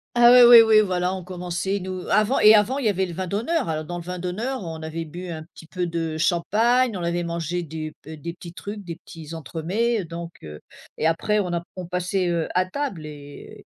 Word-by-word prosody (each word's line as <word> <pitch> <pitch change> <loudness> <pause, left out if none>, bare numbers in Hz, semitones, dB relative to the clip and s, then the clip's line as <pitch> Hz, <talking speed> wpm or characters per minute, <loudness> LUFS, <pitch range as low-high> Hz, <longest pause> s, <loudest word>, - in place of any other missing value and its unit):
Ah 240 0 +7
oui, 250 - +9
oui, 235 -1 +10
oui, 220 -1 +6
voilà 180 -2 0
on 185 - -7
commençait 180 +2 -3
nous 185 -1 -6
avant 215 +5 +3
et 215 +1 +8
avant 220 +6 +3
il 270 - -3
y 215 - +4
avait 190 -1 0
le 175 - -7
vin 185 +2 -4
d'honneur. 220 - -1
Alors 155 -1 -2
dans 175 - -6
le 175 - -7
vin 180 +1 -6
d'honneur 215 +9 -3
on 165 -3 -6
avait 160 +1 -4
bu 175 +3 -8
un 160 -2 -6
petit 165 0 -16
peu 180 +1 -3
de 165 -2 -3
champagne, 220 +8 +2
on 175 - -5
avait 170 0 -1
mangé 170 +1 -3
des 155 -1 -6
b 160 +1 -8
des 170 +3 -6
petits 170 0 -11
trucs, 205 +4 -7
des 170 -2 -7
petits 160 -1 -11
entremets, 185 - -1
donc, 170 0 -7
heu, 75 -1 -9 0.4
et 160 - +1
après 210 +6 +1
on 180 -4 -2
a 170 - -1
p - - -20
on 180 -2 -6
passait, 180 +1 -1
heu, 170 -2 -1
à 185 0 +3
table 185 - -4
et 145 -1 -11
180 Hz, 235 wpm, -23 LUFS, 165-205 Hz, 0.4 s, oui